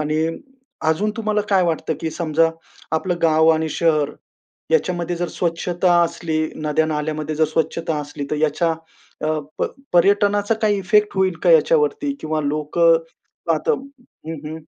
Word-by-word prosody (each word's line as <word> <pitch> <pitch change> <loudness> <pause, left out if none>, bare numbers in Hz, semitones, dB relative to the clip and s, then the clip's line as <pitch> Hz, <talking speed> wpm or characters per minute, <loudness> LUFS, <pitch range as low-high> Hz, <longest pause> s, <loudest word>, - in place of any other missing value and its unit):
आणि 155 +1 0 0.6
अजून 195 +7 +1
तुम्हाला 215 -1 0
काय 190 -2 +4
वाटतं? 160 -1 -1
की 160 - -2
समजा 165 0 +1 0.4
आपलं 175 +2 0
गाव 160 0 +4
आणि 160 0 +1
शहर 155 -3 +1 0.6
याच्यामध्ये 175 - 0
जर 175 +1 -2
स्वच्छता 175 +1 0
असली, 170 -1 -2 0.2
नद्या 155 +1 0
नाल्यामध्ये 155 0 -2
जर 155 0 +3
स्वच्छता 160 0 -1
असली 145 0 -6
तर - - +1
याच्या 155 +2 +1 0.5
अ, 155 0 0 0.2
प - - +2 0.3
पर्यटनाचा 205 +3 +3
काही 210 -2 +2
इफेक्ट 210 +2 +3
होईल 190 -1 +2
का - - +5
याच्यावरती? 445 - +3
किंवा 155 0 -1
लोकं 155 +3 +2 0.6
आता 155 -1 0
हं, 265 - -9
हं. 160 +1 -6
165 Hz, 145 wpm, -21 LUFS, 155-195 Hz, 0.6 s, का